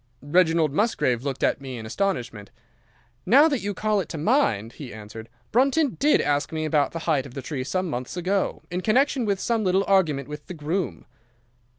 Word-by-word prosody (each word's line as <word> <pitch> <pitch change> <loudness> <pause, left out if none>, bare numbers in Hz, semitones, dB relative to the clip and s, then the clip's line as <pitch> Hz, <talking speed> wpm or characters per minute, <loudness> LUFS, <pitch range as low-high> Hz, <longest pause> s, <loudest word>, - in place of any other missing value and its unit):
"Reginald 160 -1 +2
Musgrave 145 - +1
looked 135 -1 -4
at - - +1
me 130 -2 -6
in 110 - -7
astonishment. 115 - -3 0.7
'Now 285 +6 +6
that 285 -5 0
you 200 0 -3
call 215 0 +1
it 190 - -4
to 165 - -5
my 225 - +3
mind,' 110 - -2
he 140 -5 -9
answered, 110 +1 -10 0.2
'Brunton 275 +3 +2
did 295 +3 +4
ask 145 0 0
me 160 -1 -2
about 150 -2 +1
the - - -5
height 145 -5 +1
of 125 - -14
the 135 - -4
tree 140 -5 -4
some 185 +7 -2
months 125 +2 -5
ago, 190 +2 -1
in 180 +1 -2
connection 260 +4 +2
with 200 -2 0
some 230 0 0
little 190 +1 +2
argument 160 -9 +2
with 150 0 -9
the 180 - -7
groom. 165 +4 -3
165 Hz, 200 wpm, -24 LUFS, 140-200 Hz, 0.7 s, Now